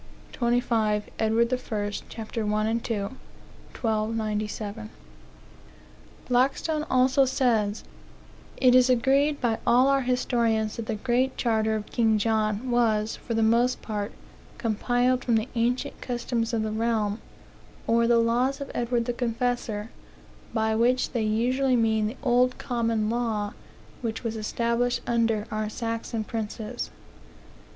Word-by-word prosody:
25 230 -4 +1
Edward 230 +2 +2
I., 215 -5 -2
ch. - - -5 0.2
1 215 -1 -1
and 230 +1 -1
2. 230 - -1
(1297.) 215 - -4 1.4
Blackstone 275 +5 +1
also 260 +1 +4
says: 235 -6 +1 0.7
"It 255 -2 +5
is 255 0 +6
agreed 275 +4 +3
by 230 -3 0
all 250 +3 +5
our 275 0 +3
historians 235 -4 0
that 230 -1 -5
the 220 - -1
Great 255 +4 0
Charter 220 -2 +1
of 210 -1 -3
King 220 -2 +2
John 215 +2 0
was, 220 -3 +2
for 230 - -5
the 225 - +2
most 235 +3 +2
part, 210 -1 -3 0.5
compiled 245 +3 +1
from 235 - +2
the 220 +3 0
ancient 240 +1 -1
customs 240 -1 -2
of 225 -2 0
the 215 - -2
realm, 220 -1 0 0.6
or 230 0 +3
the 235 0 +4
laws 245 +4 +2
of 280 - -6
Edward 240 0 0
the 245 - -1
Confessor; 235 -2 -2 0.6
by 220 -1 +1
which 245 +3 +2
they 240 - -1
usually 250 +5 +1
mean 220 -2 +2
the 225 - -6
old 250 -1 +3
common 230 -3 -1
law 220 -4 -1 0.5
which 225 -1 -3
was 230 -1 -2
established 235 +3 0
under 230 -3 +1
our 215 0 -2
Saxon 230 0 -3
princes." 220 +2 -5
230 Hz, 130 wpm, -26 LUFS, 220-245 Hz, 1.4 s, is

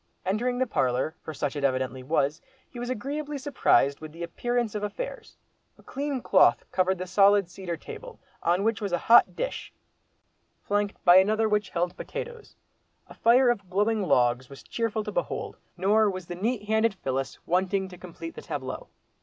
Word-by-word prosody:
Entering 240 +6 0
the 260 - +2
parlour, 130 - 0
for - - -7
such 145 -1 -3
it 145 - -4
evidently 130 -1 0
was, 145 +2 0 0.3
he 245 - -10
was 245 +1 -4
agreeably 285 +5 -3
surprised 140 - +2
with 155 -1 -9
the 165 +2 -8
appearance 240 +6 -1
of 210 - -3
affairs. 355 - -6 0.4
A - - -20
clean 280 -2 -3
cloth - - +4
covered 185 0 +1
the 185 - -4
solid 200 +1 +4
cedar 175 -3 -5
table, - - -10 0.2
on 175 +3 +1
which 225 0 0
was 200 -2 -2
a 175 - +2
hot 230 +7 +5
dish—flanked 205 - -6
by 175 +1 +9
another 215 +3 +4
which 210 -1 0
held 175 0 -1
potatoes. 475 -2 -7 0.5
A - - -11
fire 245 +2 +5
of 200 -6 -5
glowing 210 +3 +1
logs 125 -7 +2
was 140 - -12
cheerful 230 -2 -2
to - - -5
behold, - - -3 0.2
nor 210 +4 +3
was 185 -2 -5
the 175 - -6
"neat 210 +5 -2
handed 220 -1 +2
Phyllis" 135 -5 -3
wanting 190 +2 +1
to 180 - -10
complete 165 -2 -8
the - - -9
tableau. 140 -4 -5
195 Hz, 175 wpm, -27 LUFS, 170-230 Hz, 0.5 s, by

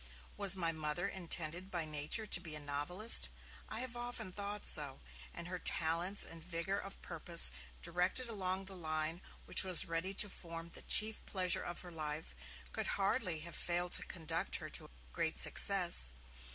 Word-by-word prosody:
Was 200 -2 +3
my 170 -3 -1
Mother 160 +3 -3
intended 175 -1 -2
by 170 -4 -3
nature 155 +8 +1
to 210 - +4
be 160 -4 -7
a - - -3
novelist? 145 +10 +4 0.4
I 220 - -3
have 255 -2 -4
often 240 -4 -6
thought 205 +2 -5
so, 145 -4 +3 0.3
and 170 0 -8
her 180 0 -6
talents 170 +5 +2
and 165 -1 -10
vigour 180 +3 -1
of 195 0 -7
purpose, 170 0 +5 0.3
directed 180 +9 -1
along 190 -3 -3
the 190 0 -9
line 155 0 -3 0.2
which - - +3
was 185 -2 +5
ready 165 +4 -3
to 210 - +5
form 170 -3 -9
'the - - -7
chief 220 0 +5
pleasure 185 -2 0
of 175 - -7
her 180 - -10
life', 155 -1 -5 0.4
could - - -3
hardly 195 -5 0
have 170 +1 -9
failed 175 0 -2
to - - +5
conduct 165 -4 -2
her - - -5
to - - -4 0.2
great - - -2
success. 60 0 +4
175 Hz, 170 wpm, -35 LUFS, 160-195 Hz, 0.4 s, purpose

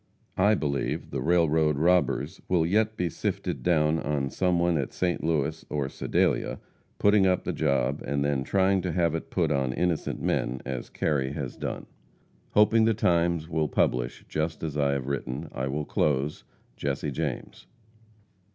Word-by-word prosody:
I 105 +3 +5
believe 70 -6 -2
the - - -2
railroad 80 -3 +3
robbers 85 0 +1
will 85 -3 +3
yet 110 +5 +1
be 90 - 0
sifted 80 - -3
down 80 -2 +2
on 70 -3 -1
some 90 +2 +1
one 85 0 +2
at 70 - -3
St. 90 -1 -1
Louis 80 -1 0
or 70 -3 -1
Sedalia - - 0 0.4
putting 105 -1 +4
up 90 -1 +1
the - - -2
job 70 +1 0
and 70 +1 -1
then 70 -2 0
trying 95 +4 +2
to 90 -2 -2
have 85 -3 +2
it 80 - -4
put - - 0
on 70 -2 +1
innocent 85 +1 -1
men, 65 +2 -1
as 65 -1 -4
Kerry 70 -3 -1
has - - -5
done. - - -5 0.7
Hoping 110 +1 +5
the 115 -1 +3
Times 85 -4 +1
will 80 -2 0
publish 60 -3 0
just 80 +1 -2
as 75 -3 -3
I 70 -2 +2
have 70 -2 -2
written, 70 +2 -4
I 65 +1 -3
will 75 +2 -2
close. 75 0 0 0.3
JESSE 70 +1 -2
JAMES. 65 - -4
80 Hz, 165 wpm, -27 LUFS, 70-90 Hz, 0.7 s, I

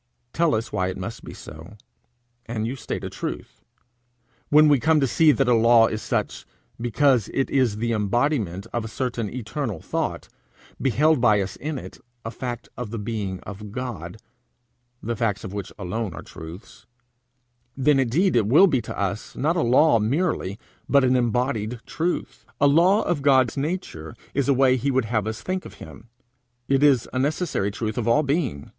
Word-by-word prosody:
Tell 165 -2 +2
us 110 +1 -4
why 95 -3 0
it 95 - -4
must - - -6
be - - -9
so, 80 +7 -11 0.7
and 110 -2 -3
you 125 +4 -3
state 130 - -5
a - - -4
truth. - - -6 0.9
When 150 +1 +6
we 145 -3 +4
come 155 +3 +3
to 135 - +2
see 155 +4 +4
that 135 0 +1
a 125 - +4
law 115 0 +6
is 110 -1 -3
such, - - -2 0.4
because 120 -1 +2
it 135 - 0
is 125 -6 +2
the 115 +2 -1
embodiment 105 - 0
of 120 - -1
a - - -5
certain 120 -2 -3
eternal 120 - -4
thought, - - -3 0.5
beheld 140 +3 +3
by 105 -4 +4
us 95 -1 -3
in 150 0 -4
it, - - -9 0.3
a 115 - -3
fact 120 -1 -6
of 125 -3 -5
the 115 - -5
being 105 -4 -4
of 100 +1 -9
God, 110 -7 -6 0.9
the 115 +2 -2
facts 105 -2 -1
of 95 - -7
which 100 -2 -5
alone 100 -1 -4
are - - -8
truths, 80 +4 -11 0.9
then 140 +1 +3
indeed 150 +10 +2
it 110 -4 +3
will 150 - +7
be 140 -10 +1
to 110 - -7
us, 100 +1 -3
not 155 +5 0
a 170 - +1
law 125 +1 +4
merely, 110 - -1 0.3
but 140 -1 +5
an 130 0 +3
embodied 120 -1 0
truth. 170 +2 -3 0.2
A 145 - +4
law 175 +9 +4
of 175 -5 -1
God's 130 -4 +3
nature 140 - -4 0.2
is 140 0 0
a - - +6
way 130 -1 +4
he 135 +3 -1
would 130 -3 +1
have 110 -2 -1
us 110 0 -5
think 185 0 -2
of - - -11
him; 105 +9 -13 0.6
it 135 0 +2
is 140 -5 +4
a 130 - 0
necessary 145 - 0
truth 110 +2 -3
of 120 - -2
all 120 +6 +4
being. 135 - -1
120 Hz, 185 wpm, -24 LUFS, 105-140 Hz, 0.9 s, will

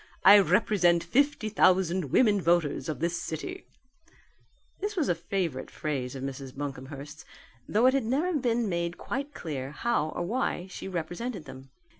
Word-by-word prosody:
I 205 +2 +10
represent 180 -2 +3
fifty 280 -4 +1
thousand 185 -4 +3
women 205 - +3
voters 170 -3 +1
of 155 - -4
this 170 +1 -1
city 365 - -6 0.5
" - - -38
(This 415 +1 -2
was 325 -7 0
a - - +4
favourite 170 -5 -3
phrase 135 -4 -3
of 135 - -6
Mrs. 135 -1 -6
Buncomhearst's, 145 +2 -7 0.5
though 220 +4 +3
it 260 - +6
had 270 -4 +1
never 295 +10 0
been 240 -5 +1
made 170 -1 -2
quite 280 +3 -4
clear 135 -5 -4
how 155 0 0
or 175 - -4
why 200 -2 -1
she - - -7
represented 180 +3 -4
them.) 130 +1 -11
175 Hz, 160 wpm, -28 LUFS, 150-230 Hz, 0.5 s, I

